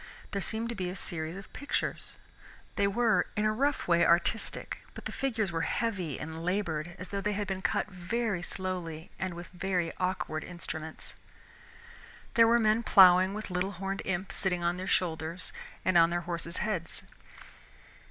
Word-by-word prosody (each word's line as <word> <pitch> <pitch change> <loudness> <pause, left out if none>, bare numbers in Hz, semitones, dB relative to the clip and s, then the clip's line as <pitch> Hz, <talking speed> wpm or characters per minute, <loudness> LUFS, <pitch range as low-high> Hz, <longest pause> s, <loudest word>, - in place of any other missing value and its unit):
There 200 - -1
seemed 225 +4 -1
to - - -2
be 185 -5 -2
a 180 - -5
series 165 -2 -4
of 195 - -11
pictures. 285 +1 -2 0.6
They 200 - +3
were, 225 +3 +3
in 210 - +1
a 215 - +4
rough 275 +6 0
way, 170 -1 +5
artistic, 175 +6 +2 0.2
but - - -9
the - - -3
figures 225 -8 -1
were 165 -1 -1
heavy 190 - -1
and 160 +1 -6
labored, 175 -3 -1
as 185 - -8
though 200 0 -2
they 210 +1 0
had 205 +1 -1
been 190 -1 -3
cut - - +1
very 200 +1 -2
slowly 180 -3 -4
and 185 -2 -2
with 175 +1 -7
very 180 -2 -1
awkward 180 -4 -1
instruments. 160 -3 -6 1.2
There 230 -1 +7
were 235 +1 +6
men 220 0 +3
plowing 185 -2 +7
with 215 -2 -5
little 185 +2 -1
horned 195 +1 -3
imps 190 0 -2
sitting 180 -3 0
on 175 +1 +1
their 185 - -4
shoulders 165 0 -1 0.3
and 185 -2 +5
on 165 0 +6
their 175 0 0
horses' 170 0 -3
heads. 190 -6 -2
185 Hz, 170 wpm, -30 LUFS, 170-205 Hz, 1.2 s, There